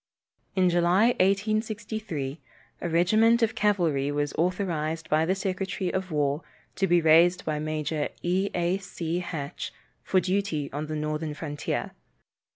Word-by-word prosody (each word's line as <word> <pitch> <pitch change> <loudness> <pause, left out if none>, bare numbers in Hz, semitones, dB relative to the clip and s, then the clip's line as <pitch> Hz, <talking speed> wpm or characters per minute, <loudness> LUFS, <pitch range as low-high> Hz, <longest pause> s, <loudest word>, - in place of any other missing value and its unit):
In 185 -1 +4
July, 175 +6 +4
1863, 205 - -1 0.4
a 175 - -2
regiment 220 +8 +4
of 225 0 +2
cavalry 170 - +1
was 145 0 -1
authorized 165 -3 -1
by 155 +1 +3
the 190 - +2
secretary 190 -1 -2
of 190 0 -2
war 145 0 +1 0.4
to 195 - +2
be 175 0 +4
raised 170 +3 +5
by 150 -1 -1
Major 155 0 -2
E. 185 +3 +1
A. 175 +2 +1
C. 175 -3 -3
Hatch, 160 -5 -5 0.3
for 190 - +2
duty 185 -6 -1
on 150 +2 -3
the 155 - -3
northern 150 0 -2
frontier. 145 -1 -3
175 Hz, 140 wpm, -27 LUFS, 155-195 Hz, 0.4 s, raised